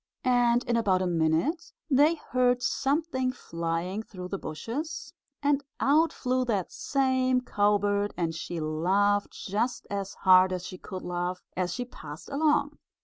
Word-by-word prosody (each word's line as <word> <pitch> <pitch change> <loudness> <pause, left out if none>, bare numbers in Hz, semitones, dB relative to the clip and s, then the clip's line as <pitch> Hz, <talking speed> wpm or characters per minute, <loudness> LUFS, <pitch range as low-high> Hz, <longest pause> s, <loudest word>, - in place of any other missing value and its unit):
And 245 -1 +3
in 235 - 0
about 190 -5 +2
a - - 0
minute 170 - 0 0.2
they 295 +3 +4
heard 250 -4 +1
something 270 0 0
flying 170 -2 -3
through 180 -4 -9
the 195 - -3
bushes 300 - -5 0.3
and 285 0 +2 0.2
out 310 +4 +4
flew 255 0 0
that 205 -7 -1
same 260 -2 +1
cowbird, 205 -2 +1
and 165 -2 -1
she 170 +1 -5
laughed 190 +7 +1
just 225 +5 -2
as 200 -1 -3
hard 185 0 +6
as 180 -1 -4
she 185 - -8
could 185 -1 -7
laugh, 180 +1 -3
as 180 -1 -1
she 250 - -3
passed 155 -10 -10
along. 295 0 +1
210 Hz, 145 wpm, -28 LUFS, 180-260 Hz, 0.3 s, hard